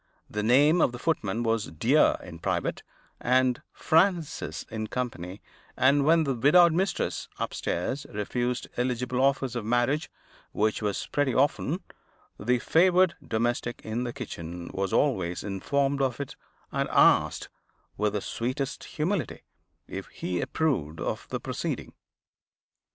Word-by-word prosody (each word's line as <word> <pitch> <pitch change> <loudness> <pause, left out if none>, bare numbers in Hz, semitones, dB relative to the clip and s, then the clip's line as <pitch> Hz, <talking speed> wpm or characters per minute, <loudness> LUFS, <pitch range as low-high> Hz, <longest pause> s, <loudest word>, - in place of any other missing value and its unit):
The 105 - -3
name 145 +9 +5
of 120 - +3
the - - -5
footman 120 -7 -1
was 115 -2 +1
Dear 80 - +3
in - - -10
private, - - -1 0.4
and 125 0 +2
Francis 170 -1 +1
in 110 -1 -3
company; 105 -6 -5 0.3
and 140 +2 +4
when 165 +1 +5
the 140 -3 0
widowed 160 +8 +6
mistress, 185 +2 -1
upstairs, 135 +11 -2
refused 120 +4 -2
eligible 125 0 0
offers 135 -2 +1
of 120 - -2
marriage 120 +7 +1 0.4
(which 110 +1 +1
was 105 -2 -1
pretty 145 -3 +1
often), 145 +5 +1 0.6
the 125 +4 +2
favored 180 +6 +4
domestic 120 +1 -1
in 110 +3 -2
the 120 - -3
kitchen 85 -9 -7
was 95 0 -1
always 95 -12 +1
informed 140 +8 0
of 130 -2 0
it, 140 - -5 0.4
and - - -1
asked, - - +4 0.5
with 105 0 0
the 105 - -1
sweetest 130 +6 -3
humility, 170 +3 -2 0.5
if - - -6
he 90 -1 -3
approved 80 - -1
of - - -3
the - - -2
proceeding. - - -4
125 Hz, 135 wpm, -27 LUFS, 110-145 Hz, 0.6 s, widowed